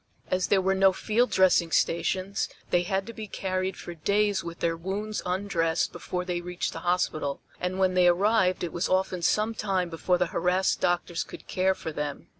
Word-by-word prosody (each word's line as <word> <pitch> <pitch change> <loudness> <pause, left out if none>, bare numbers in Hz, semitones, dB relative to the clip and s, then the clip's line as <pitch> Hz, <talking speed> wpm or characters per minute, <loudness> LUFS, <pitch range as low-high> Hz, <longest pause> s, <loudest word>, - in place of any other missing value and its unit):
As 185 0 +1
there 195 -2 +3
were 190 +1 +2
no 195 0 +4
field 230 +6 +1
dressing 185 -3 +4
stations 185 +4 0 0.2
they 175 - +4
had 190 +1 -1
to 230 - -8
be 220 -1 -7
carried 185 -1 -2
for 175 - -7
days 200 +4 +1
with 170 0 -7
their 165 0 0
wounds 200 +5 -3
undressed 180 -3 0
before 180 +1 -4
they 175 -1 -2
reached 180 0 -3
the - - -5
hospital, 155 -5 -1 0.2
and 180 +1 -2
when 190 -1 +2
they 180 -1 +5
arrived 185 +1 +3
it 170 - -3
was 170 - -1
often 185 -1 +1
some 215 +6 +2
time 190 -5 -1
before 180 +2 +1
the 180 - +2
harassed 185 +1 +1
doctors 175 -1 0
could - - -11
care 190 +1 +1
for 160 - -6
them. 150 -1 -5
185 Hz, 195 wpm, -27 LUFS, 175-195 Hz, 0.2 s, they